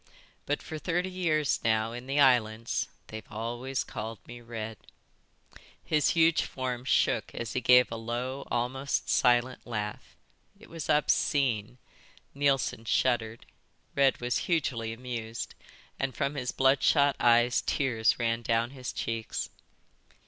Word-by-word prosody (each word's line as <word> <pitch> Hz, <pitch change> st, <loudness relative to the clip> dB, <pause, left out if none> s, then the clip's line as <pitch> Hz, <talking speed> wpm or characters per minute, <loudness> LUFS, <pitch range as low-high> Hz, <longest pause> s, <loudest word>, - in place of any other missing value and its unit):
But 145 Hz, -, -1 dB
for 155 Hz, -, -6 dB
thirty 180 Hz, +3 st, -1 dB
years 155 Hz, -5 st, +1 dB
now 110 Hz, 0 st, +1 dB
in 120 Hz, +2 st, -8 dB
the 140 Hz, +2 st, 0 dB
islands 115 Hz, -4 st, +3 dB, 0.2 s
they've 110 Hz, 0 st, -9 dB
always 120 Hz, +4 st, -3 dB
called 110 Hz, +1 st, -6 dB
me 120 Hz, 0 st, -10 dB
Red." 115 Hz, -2 st, -6 dB, 1.1 s
His 150 Hz, -1 st, +2 dB
huge 165 Hz, 0 st, +5 dB
form 125 Hz, -1 st, -4 dB
shook -, -, +1 dB
as 115 Hz, -3 st, -4 dB
he 125 Hz, -, -1 dB
gave 125 Hz, 0 st, +6 dB
a 115 Hz, -, -3 dB
low, 125 Hz, +4 st, -4 dB
almost 130 Hz, +3 st, -1 dB
silent 125 Hz, +1 st, +2 dB
laugh. 105 Hz, -3 st, -5 dB, 0.4 s
It -, -, -16 dB
was 165 Hz, -2 st, -6 dB
obscene. 130 Hz, -6 st, +1 dB, 0.6 s
Neilson 135 Hz, -5 st, 0 dB
shuddered. 115 Hz, -1 st, 0 dB, 0.5 s
Red 135 Hz, -1 st, +3 dB
was 120 Hz, 0 st, 0 dB
hugely 125 Hz, -9 st, 0 dB
amused, 115 Hz, -1 st, -5 dB, 0.5 s
and 135 Hz, -2 st, -2 dB
from 140 Hz, 0 st, -1 dB
his 130 Hz, -4 st, -3 dB
bloodshot 140 Hz, +1 st, +3 dB
eyes 120 Hz, +1 st, +4 dB
tears 115 Hz, -6 st, +1 dB
ran 115 Hz, -1 st, 0 dB
down 115 Hz, +1 st, 0 dB
his 130 Hz, -2 st, -6 dB
cheeks. 115 Hz, -1 st, -4 dB
125 Hz, 130 wpm, -29 LUFS, 115-140 Hz, 1.1 s, gave